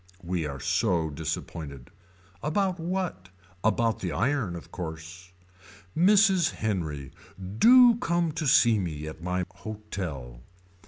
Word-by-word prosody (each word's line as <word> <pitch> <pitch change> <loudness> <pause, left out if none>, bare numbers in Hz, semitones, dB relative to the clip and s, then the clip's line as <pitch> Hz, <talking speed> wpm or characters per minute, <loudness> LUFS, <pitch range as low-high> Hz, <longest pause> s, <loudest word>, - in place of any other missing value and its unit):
We 85 -3 -2
are 70 -1 -6
so 85 - +1
disappointed. 75 -3 -6 0.5
About 185 +4 0
what. 170 - -3 0.3
About 115 0 +1
the 90 - -3
iron 110 - 0
of 85 - -10
course. 85 +1 -8 0.6
Mrs. 190 -1 +5
Henry. 80 -10 -3 0.5
Do 245 -1 +8
come 170 -7 0
to 155 0 -3
see 115 -4 +5
me 80 -5 -4
at 80 +1 -8
my 90 +1 -1
hotel. 90 - -6
95 Hz, 115 wpm, -27 LUFS, -, 0.6 s, Do